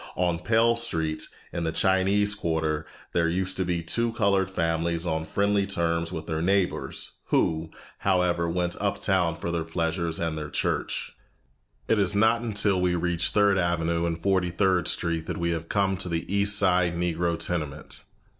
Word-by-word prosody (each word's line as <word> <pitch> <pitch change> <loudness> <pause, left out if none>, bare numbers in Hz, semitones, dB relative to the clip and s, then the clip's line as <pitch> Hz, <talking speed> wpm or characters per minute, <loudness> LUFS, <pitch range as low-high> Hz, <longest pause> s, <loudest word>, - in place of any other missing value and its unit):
On 90 -2 0
Pell 115 +5 +3
Street, 80 -10 -1 0.3
in 85 - -2
the 80 - 0
Chinese 95 +3 +2
quarter, 80 -5 -1 0.3
there 85 -1 +2
used 95 +2 -1
to 95 - +1
be 85 -2 -2
two 115 +8 0
colored 100 -4 +2
families 85 -1 -1
on 80 -2 -1
friendly 100 +4 +1
terms 85 -3 0
with 80 -3 -5
their 80 -1 -2
neighbors, 95 +1 0
who, 80 0 +1 0.3
however, 90 -3 +1
went 90 0 -1
uptown 95 -4 +1
for 85 +1 -4
their 85 -1 -1
pleasures 80 0 -2
and 80 -2 -1
their 75 -1 -5
church. - - -2 0.7
It 110 - +2
is 100 0 +1
not 110 +3 +3
until 105 -4 +1
we 90 -1 +2
reach 85 -1 0
Third 100 -2 +3
Avenue 85 -1 0
and 85 0 -3
Forty 95 -2 +2
third 90 -1 +1
Street 85 -1 -1
that - - -3
we 85 -1 0 0.2
come 100 -1 +1
to 90 -1 -3
the 85 -1 -2
East 100 0 +5
Side 90 -4 +2
Negro 85 0 0
tenement. 75 -4 -3
85 Hz, 165 wpm, -26 LUFS, 85-100 Hz, 0.7 s, East